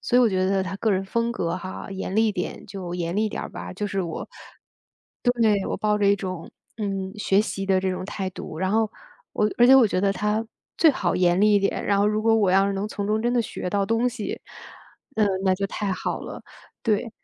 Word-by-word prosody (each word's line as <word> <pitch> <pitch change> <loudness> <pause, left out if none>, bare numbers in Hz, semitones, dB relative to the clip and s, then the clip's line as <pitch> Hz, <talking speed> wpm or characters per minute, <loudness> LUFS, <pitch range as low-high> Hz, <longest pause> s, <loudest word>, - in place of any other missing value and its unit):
所 245 - +1
以 - - +6
我 235 - +5
觉 185 -1 +1
得 195 0 +2
他 190 +1 -4
个 220 +1 0
人 190 +1 0
风 235 +4 -1
格 170 -6 -2
哈， 185 +1 -7
严 195 0 -4
厉 220 0 +4
点 180 -3 -4
就 185 -3 -6
严 170 0 -2
厉 215 +1 +2
点 - - -5
儿 - - -5
吧， - - -7
就 205 +3 -3
是 195 -1 -2
我 170 -3 -4 0.9
对， 225 -5 +2
我 - - -2
抱 210 0 +1
着 200 - +2
一 200 - +5
种， 185 -4 -6 0.3
嗯， 195 -2 -3
学 200 -1 +3
习 195 -2 -3
的 190 -1 +3
这 190 0 0
种 185 0 -4
态 190 -1 -4
度， 160 -3 -8
然 190 +1 0
后 220 0 +2 0.4
我 210 0 +1
而 240 - +7
且 265 - +8
我 245 -4 +7
觉 185 - 0
得 195 0 +2
他 210 +3 -1 0.3
最 320 -2 +7
好 180 -10 -1
严 180 +1 +3
厉 210 0 +5
一 - - +6
点， 200 - -1
然 200 -1 +2
后 205 - +3
如 215 +1 +1
果 225 0 +4
我 205 -4 +3
要 195 +1 +4
是 200 - 0
能 195 +2 -2
从 200 -1 -4
中 215 +1 +1
真 240 +1 +1
的 240 - +3
学 180 - -5
到 200 -1 +1
东 230 +3 +1
西， 225 -3 -5 0.8
嗯， 215 -2 +4 0.2
那 190 -1 +4
就 195 +1 -2
太 195 0 -2
好 - - -3
了， - - -8 0.4
对。 225 0 0
200 Hz, 260 characters per minute, -24 LUFS, 190-215 Hz, 0.9 s, 且